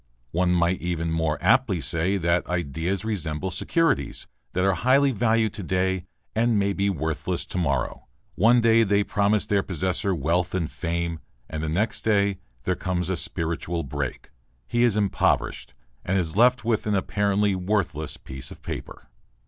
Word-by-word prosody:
One 90 +1 +1
might 90 +1 +2
even 85 -2 -2
more 80 -2 0
aptly 115 -9 +3
say 85 +7 +1
that 85 -1 +1
ideas 85 +4 -2
resemble 95 -4 -2
securities 160 - 0 0.3
that 90 - +1
are 95 0 +3
highly 135 +8 +3
valued 110 -1 +1
to - - -6
day 95 0 0 0.3
and 115 0 +2
may 100 0 +1
be 100 +1 +1
worthless 80 0 -2
to 90 - -3
morrow; 70 -6 -1 0.3
one 120 +4 +4
day 115 0 +5
they 100 -1 +3
promise 100 +1 +1
their 100 -1 +2
possessor 95 +2 -1
wealth 85 +4 0
and 85 -4 -1
fame, 85 -1 -2 0.3
and 80 - -5
the 80 - -2
next 100 +8 0
day 100 -3 +2 0.2
there 90 - +1
comes 90 -1 -2
a - - +1
spiritual 85 0 -2
break, 70 -3 -5 0.3
he 120 - 0
is 120 -4 +4
impoverished, 100 -2 0 0.3
and 95 +1 0
is 85 -3 -1
left 125 +2 +4
with 115 -2 0
an 105 - +2
apparently 100 +1 +1
worthless 90 -6 -1
piece 65 0 -7
of - - -12
paper.... - - -7
95 Hz, 165 wpm, -25 LUFS, 85-105 Hz, 0.3 s, day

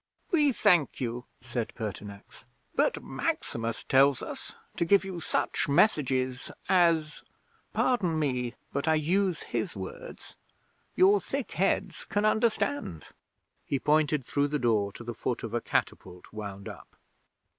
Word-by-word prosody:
'"We 300 -5 +4
thank 180 -10 +3
you," 120 0 -3 0.2
said 120 -1 -4
Pertinax. 105 -2 -7 0.3
"But - - +1
Maximus 115 -1 -2
tells 135 0 +4
us - - -7 0.2
to - - +2
give 195 +3 +4
you 185 -3 -5
such 155 - -1
messages 130 -6 +2 0.2
as 165 -5 +3 0.5
pardon 190 -11 +1
me, 125 -5 -1 0.2
but 140 +3 -1
I 160 - +5
use 175 +3 +1
his - - -3
words - - -8 0.6
your 395 +2 +5
thick - - -4
heads - - 0
can 205 +1 0
understand." 220 - 0 0.6
He 140 - -1
pointed 150 -1 +2
through 145 +2 +1
the 150 +1 -1
door 110 -6 +1
to - - -9
the 120 0 -5
foot 120 +2 -3
of 115 -1 -5
a 120 - 0
catapult 90 -3 -3
wound 100 -2 -6
up. - - -11
145 Hz, 135 wpm, -29 LUFS, 120-180 Hz, 0.6 s, I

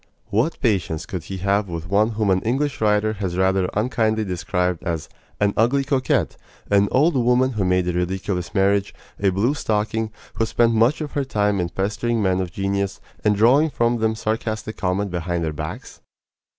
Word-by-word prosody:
What 115 +11 +1
patience 95 - 0
could 90 -4 -6
he 95 +1 -5
have 100 +1 +2
with 85 -1 -5
one 105 +4 +2
whom 105 -2 +1
an 95 0 +2
English 135 +4 -1
writer 105 0 +2
has 90 -2 -2
rather 95 0 +2
unkindly 110 -1 +1
described 90 -1 -1
as 85 -3 -3 0.3
"an 100 -1 +2
ugly 125 +5 +2
coquette, 135 -2 0 0.3
an 100 0 +4
old 150 +6 +3
woman 125 +1 +3
who 110 -5 -1
made 90 -1 +1
a 90 - 0
ridiculous 90 +1 -2
marriage, 100 0 +2 0.2
a 100 - +3
blue 100 +9 +1
stocking, 110 -3 -1 0.2
who 115 - 0
spent 115 0 +2
much 115 +8 +3
of 150 - -4
her 140 - -1
time 105 -5 0
in 85 -1 -1
pestering 105 +5 -1
men 95 -2 +1
of 90 -2 -4
genius, 100 +1 -2 0.2
and 105 -1 +3
drawing 130 +9 +4
from 120 -3 +1
them 110 0 0
sarcastic 110 0 -3
comment 95 +1 -1
behind 85 -1 -2
their 80 -1 -2
backs?" 75 +1 -7
105 Hz, 180 wpm, -22 LUFS, 95-115 Hz, 0.3 s, an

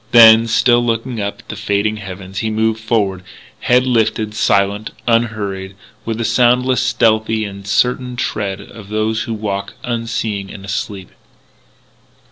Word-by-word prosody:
Then, 115 -1 +8
still 120 +2 +3
looking 115 0 -2
up 100 0 -4
at - - -32
the - - -5
fading 105 +1 0
heavens, 95 -1 -7
he 110 - -1
moved 110 0 0
forward, 105 -4 0 0.4
head 125 +1 +3
lifted, 110 -3 +1
silent, 100 0 +1 0.2
unhurried, 105 -5 -1 0.3
with 115 -1 -2
the 115 - -2
soundless, 125 +2 +3
stealthy, 110 -2 +1
and 100 -1 -9
certain 125 +3 +1
tread 105 -4 -2
of 100 0 -12
those 110 +1 0
who 115 - -3
walk 100 -2 -4
unseeing 115 -4 -3
and 95 - -10
asleep. 100 -1 -4
110 Hz, 140 wpm, -17 LUFS, 100-115 Hz, 0.4 s, Then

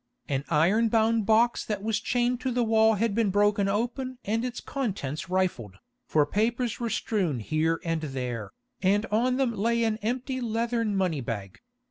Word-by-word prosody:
An 135 0 -1
iron 190 +9 +3
bound 225 -1 +2
box 230 +2 +3
that 205 -2 -4
was 220 -2 0
chained 245 +2 0
to 260 - -1
the 245 0 +1
wall 220 0 +4
had 220 +1 0
been 220 -1 +2
broken 205 +1 +2
open 245 +5 -2
and 225 +3 0
its 250 -1 -3
contents 190 - -4
rifled, 175 - -1 0.3
for 150 -2 +3
papers 230 - -1
were 235 -1 -2
strewn 195 - -1
here 155 +7 0
and 165 -1 -1
there, 125 -7 -4 0.3
and 205 +3 +2
on 250 +4 +2
them 260 -3 +1
lay 230 +3 +1
an 220 -1 +1
empty 255 +4 -3
leathern 230 -2 -1
money 180 -7 0
bag. 100 -5 -5
215 Hz, 170 wpm, -27 LUFS, 170-235 Hz, 0.3 s, wall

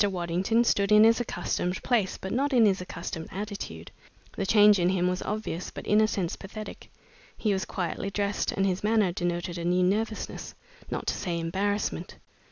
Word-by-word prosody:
Waddington 190 +4 +1
stood 200 -3 +2
in 210 0 +8
his 225 +1 +5
accustomed 180 -4 -2
place 220 -7 +1
but 190 - -6
not 275 +3 0
in 235 -3 +6
his 195 -2 +2
accustomed 160 -2 -6
attitude. 195 - -6 0.4
The 195 - -2
change 210 -1 +6
in 175 0 +3
him 180 -1 +1
was 180 0 -1
obvious 210 -5 -3
but - - -9
in 210 +1 +4
a 215 - +4
sense 190 -5 -2
pathetic. 215 +2 -9 0.5
He 210 -3 +1
was 190 - -1
quietly 185 +1 -3
dressed, 200 +1 -1
and 195 - 0
his 185 0 -1
manner 210 -3 +3
denoted 175 0 -2
a - - -4
new 180 +1 +2
nervousness, 215 +4 -2 0.3
not - - -3
to - - 0
say 170 -3 -3
embarrassment. 195 +5 -2
195 Hz, 180 wpm, -27 LUFS, 180-210 Hz, 0.5 s, in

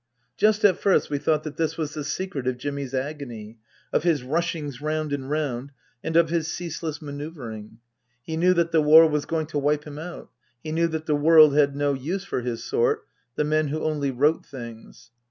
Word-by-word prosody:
Just 215 - +3
at 185 -4 +4
first 195 - +2
we 145 - 0
thought 155 +1 +1
that 155 -2 -7
this 160 -1 -1
was 155 -3 -3
the 150 - -4
secret 150 -4 -4
of 130 -1 0
Jimmy's 140 0 -4
agony, 125 -6 -5 0.3
of - - +3
his 155 -5 +1
rushings 150 -1 -2
round 155 -1 -2
and 135 -1 -4
round, 140 -3 -2 0.3
and 160 - -3
of 165 -1 +4
his 165 -2 0
ceaseless 165 -2 -5
manoeuvring. 140 -8 -7 0.5
He 160 - -4
knew 180 +3 +3
that 170 -1 +1
the 160 -1 +4
War 160 +2 +8
was 150 -2 -1
going 160 -1 -1
to 150 -1 -3
wipe 145 +1 +1
him 150 -1 -8
out; 175 +2 -8 0.3
he 155 - -5
knew 165 +1 +2
that 160 -1 -4
the 155 - +1
world 155 -1 +7
had 145 -2 +3
no 145 0 +1
use 170 +9 -3
for - - -2
his 120 -1 -4
sort, 445 0 0 0.3
the - - +1
men 155 0 +1
who 155 +2 -3
only 150 -3 0
wrote 145 +5 +2
things. 115 -3 -11
150 Hz, 205 wpm, -25 LUFS, 140-165 Hz, 0.5 s, War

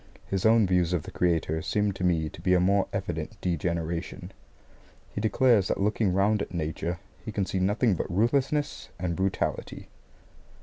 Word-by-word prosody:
His 95 +2 +1
own 110 -1 +5
views 90 -2 +2
of 85 -4 0
the - - -9
Creator 80 -2 0
seem 105 +2 0
to 95 -1 -6
me 85 -3 +2
to 80 - -10
be 90 +1 +3
a - - +4
more 95 +2 +3
evident - - -4
degeneration. 85 +1 -3 0.8
He - - -3
declares 110 -2 +3
that - - -1
looking 105 0 +1
round 100 +3 +2
at 90 - -5
Nature 85 +1 -2 0.3
he 110 - -5
can 100 -2 -1
see 95 - -2
nothing 105 +4 +2
but 90 - -3
ruthlessness 135 - 0
and 90 -2 -2
brutality. 95 +1 -2
95 Hz, 170 wpm, -27 LUFS, 85-105 Hz, 0.8 s, own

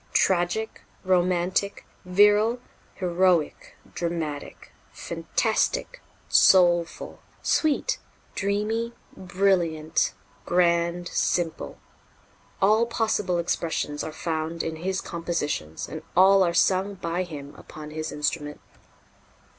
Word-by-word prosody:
Tragic, 190 +4 +1 0.2
romantic, 185 +1 +1 0.2
virile, 210 +5 +4 0.4
heroic, 180 -3 0 0.2
dramatic, 165 -4 -5 0.2
fantastic, 65 - -1 0.3
soulful, 175 -2 +3 0.2
sweet, 315 - +1 0.3
dreamy, 210 +4 -1 0.2
brilliant, 175 - 0 0.3
grand, 170 - +1
simple 170 -2 -1 0.9
all 215 +4 +4
possible 220 -6 0
expressions 165 -3 -2
are 160 - -5
found 160 +1 -3
in 160 -1 -4
his 190 +3 -2
compositions 165 - -3
and - - -7 0.2
all 195 +1 +7
are 175 -2 +3
sung 190 +3 +2
by 170 -1 -3
him 145 -5 -7
upon 150 -1 -11
his 155 0 -4
instrument." 150 0 -3
175 Hz, 90 wpm, -25 LUFS, 165-195 Hz, 0.9 s, all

